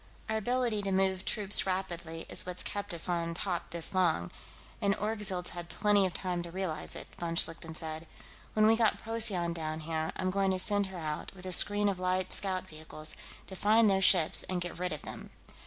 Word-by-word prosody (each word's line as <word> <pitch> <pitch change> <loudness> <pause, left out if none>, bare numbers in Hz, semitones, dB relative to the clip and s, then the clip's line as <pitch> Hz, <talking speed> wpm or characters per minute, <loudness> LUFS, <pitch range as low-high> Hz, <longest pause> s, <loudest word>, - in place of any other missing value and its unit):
"Our 220 0 -1
ability 240 -1 0
to 195 -1 -3
move 190 0 0
troops 205 -2 +2
rapidly 170 -3 -4
is - - 0
what's 180 0 -5
kept 205 0 -4
us 170 0 -3
on 170 -1 -2
top 175 -1 -3
this 170 +1 +3
long, 170 - +1 0.5
and 200 -1 +2
Orgzild's 210 -4 -1
had 175 -1 -8
plenty 205 -2 +2
of 180 - -8
time 180 -2 -2
to 170 - -6
realize 170 -3 -3
it," - - -7
von 170 -1 -3
Schlichten 165 -1 +2
said. 160 0 -1 0.5
"When 215 0 +3
we 220 +1 +5
get 225 -1 +2
Procyon 215 -7 -1
down 160 -1 -4
here, 160 0 -3
I'm 185 0 -1
going 195 0 +1
to 190 - 0
send 205 +1 +2
her 190 -1 -9
out, 155 +2 -5
with 185 0 -12
a 185 - -4
screen 205 +3 +7
of 195 -2 -1
light 185 0 +1
scout 190 -2 -2
vehicles, 155 -1 -3 0.3
to 190 - -8
find 215 +3 +4
those 195 0 +1
ships 175 -5 +5
and 185 -1 -1
get 175 -1 -6
rid 180 0 -2
of 155 - -5
them.... - - -9
185 Hz, 205 wpm, -30 LUFS, 170-200 Hz, 0.5 s, screen